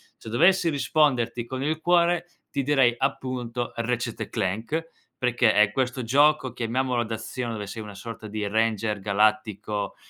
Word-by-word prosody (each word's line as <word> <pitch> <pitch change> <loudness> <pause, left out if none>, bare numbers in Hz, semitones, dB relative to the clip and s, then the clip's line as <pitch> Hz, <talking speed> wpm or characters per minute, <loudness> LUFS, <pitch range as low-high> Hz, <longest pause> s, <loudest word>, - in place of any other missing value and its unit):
Se - - -11
dovessi 170 - +4
risponderti 135 -6 +1
con 130 +1 -4
il 155 +2 -1
cuore, 175 0 +3 0.2
ti - - -1
direi 135 -3 +3
appunto 125 -2 -2
Retchet& 115 -1 -2
Clank, 115 - -2 0.3
perché 120 -2 +3
è 105 -1 +4
questo 130 0 -1
gioco, 140 +1 +3
chiamiamolo 125 +1 0
d'azione, 115 +2 -4
dove 105 -2 -5
sei 110 +1 -6
una 105 -1 -8
sorta 110 +1 -8
di 105 0 -3
Ranger 110 -1 0
Galattico, 105 0 0
120 Hz, 145 wpm, -25 LUFS, 110-135 Hz, 0.3 s, dovessi